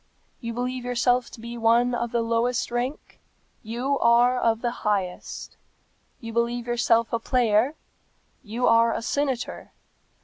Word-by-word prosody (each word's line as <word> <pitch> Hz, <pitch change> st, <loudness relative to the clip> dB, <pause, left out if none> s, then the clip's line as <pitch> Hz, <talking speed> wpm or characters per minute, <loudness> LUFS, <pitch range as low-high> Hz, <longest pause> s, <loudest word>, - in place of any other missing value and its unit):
You 230 Hz, -2 st, -5 dB
believe 250 Hz, +1 st, -3 dB
yourself 245 Hz, 0 st, +1 dB
to -, -, -12 dB
be 235 Hz, +1 st, -7 dB
of 235 Hz, +1 st, +2 dB
the 235 Hz, -1 st, +1 dB
lowest 230 Hz, +2 st, 0 dB
rank; 245 Hz, +4 st, -4 dB, 0.4 s
you 250 Hz, +5 st, -2 dB
are 240 Hz, +2 st, +4 dB
of 230 Hz, 0 st, +1 dB
the 240 Hz, -, +1 dB
highest. 195 Hz, -4 st, -3 dB, 0.6 s
You 230 Hz, -2 st, -8 dB
believe 235 Hz, +1 st, 0 dB
yourself 235 Hz, -1 st, +1 dB
a 230 Hz, -, +1 dB
player; 240 Hz, +2 st, +2 dB, 0.7 s
you 235 Hz, +3 st, -2 dB
are 230 Hz, 0 st, +4 dB
a -, -, -4 dB
senator. 270 Hz, -2 st, -2 dB
235 Hz, 135 wpm, -25 LUFS, 230-245 Hz, 0.7 s, are